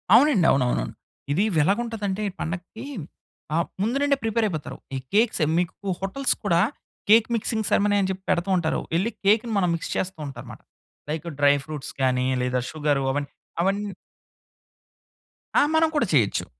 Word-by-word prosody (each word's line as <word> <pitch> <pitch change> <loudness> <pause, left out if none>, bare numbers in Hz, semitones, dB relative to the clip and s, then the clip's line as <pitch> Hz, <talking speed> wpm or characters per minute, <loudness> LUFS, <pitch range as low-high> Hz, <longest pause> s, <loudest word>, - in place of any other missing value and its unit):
అవునండి. 250 - +5
అవునవునవును. 125 - +1 0.4
ఇది 185 +8 +2
ఎలాగుంటదంటే 205 +3 0 0.2
పండక్కి 180 +8 -5 0.7
ఆహ్, 170 - +1
ముందు 235 +6 +1
నుండే 285 -1 +3
ప్రిపేర్ 225 0 +1
అయిపోతారు. 155 -6 -5 0.2
ఈ - - 0 0.2
కేక్ 220 +2 +4
సెరమనీకు 175 +4 0
హోటల్స్ 225 +8 0
కూడా 170 -4 +3 0.5
కేక్ 225 +1 +7
మిక్సింగ్ 220 -1 -1
సరిమనీ 205 0 +3
అని 190 - 0
చెప్పి 190 0 -6
పెడుతూ 185 +1 +1
ఉంటారు. 160 -2 0
ఎళ్లి 205 +7 +1
కేక్‌ని 225 +3 +3
మనం 180 -3 +2
మిక్స్ 165 - -5
చేస్తూ 185 -3 -2
ఉంటారన్నమాట 120 -4 -9 0.5
లైక్ 160 +2 -3
డ్రై 145 0 +6
ఫ్రూట్స్ 150 -3 -6
గానీ 130 -1 +2 0.2
లేదా 125 0 0
షుగర్ 145 -2 0
అవన్నీ 145 0 -2 0.3
అవన్ని 200 +2 0 1.6
ఆ! - - +7
మనం 320 0 +5
కూడా 260 -8 +2
చేయొచ్చు. 115 -8 +2
190 Hz, 145 wpm, -24 LUFS, 150-215 Hz, 1.6 s, కేక్